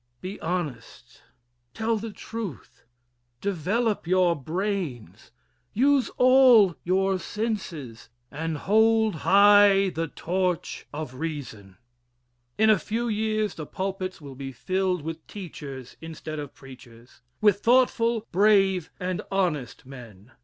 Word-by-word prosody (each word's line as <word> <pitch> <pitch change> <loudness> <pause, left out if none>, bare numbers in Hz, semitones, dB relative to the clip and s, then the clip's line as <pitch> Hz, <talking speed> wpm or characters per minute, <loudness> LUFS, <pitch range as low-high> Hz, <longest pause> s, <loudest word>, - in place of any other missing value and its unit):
Be 185 +6 -7
honest. 150 -9 -5 0.5
Tell 225 +1 0
the 225 +2 -5
truth, 205 - -8 0.5
develop 200 - -1
your 180 -1 +3
brains, 155 - -4 0.4
use 275 +3 +3
all 250 -8 +6
your 190 +1 +1
senses 175 - -5 0.2
and 160 +2 -3
hold 220 +1 +3
high 200 +1 +6
the 165 0 -3
torch 180 +2 -2
of 150 -3 -6
Reason. 130 - -7 0.8
In 220 0 +5
a 215 - +3
few 230 +2 -2
years 215 0 -1
the 155 - -8
pulpits 190 -1 -4
will 140 -3 -10
be 135 0 -7
filled 185 +5 -1
with 160 0 -7
teachers 140 - -9
instead 160 -1 -7
of 145 -2 -8
preachers 125 -3 -15 0.2
with 205 -2 +3
thoughtful, 235 -1 +2
brave, 195 -3 +3
and 180 0 -2
honest 170 -13 -2
men. 120 -5 -13
185 Hz, 115 wpm, -25 LUFS, 145-210 Hz, 0.8 s, all